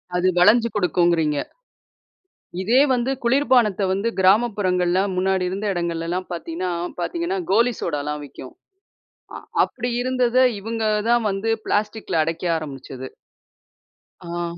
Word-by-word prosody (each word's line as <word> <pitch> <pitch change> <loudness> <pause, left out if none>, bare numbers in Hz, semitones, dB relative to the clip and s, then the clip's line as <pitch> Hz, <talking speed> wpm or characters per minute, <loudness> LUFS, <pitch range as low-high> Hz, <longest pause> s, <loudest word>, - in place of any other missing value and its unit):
அது 180 +1 +2
வளஞ்சு 230 +6 +5
குடுக்கும்குறீங்க. 170 -5 +2 1.2
இதே 230 +7 +3
வந்து 250 +1 0
குளிர்பானத்த 240 -5 +3
வந்து, 200 +4 -1
கிராமப்புறங்கள்ல 190 -3 +2
முன்னாடி 190 0 +1
இருந்த 195 +3 -4
இடங்கள்லல்லாம் 170 +1 -3
பாத்தீங்கன்னா 175 +1 -4 0.3
பாத்தீங்கன்னா, 340 - -2
கோலி 235 +4 +3
சோடால்லாம் 150 -2 -3
விக்கும். 130 -2 -11 0.8
அ - - -5 0.3
அப்டி 245 0 -5
இருந்தத 255 -1 0 0.2
இவங்கதான் 225 +2 0
வந்து 195 +3 -2 0.2
பிளாஸ்டிக்ல 210 -2 -1
அடைக்க 165 +2 -4
ஆரம்பிச்சது. 135 -4 -8 1.2
ஆ. 170 0 -4
190 Hz, 105 wpm, -22 LUFS, 170-230 Hz, 1.2 s, வளஞ்சு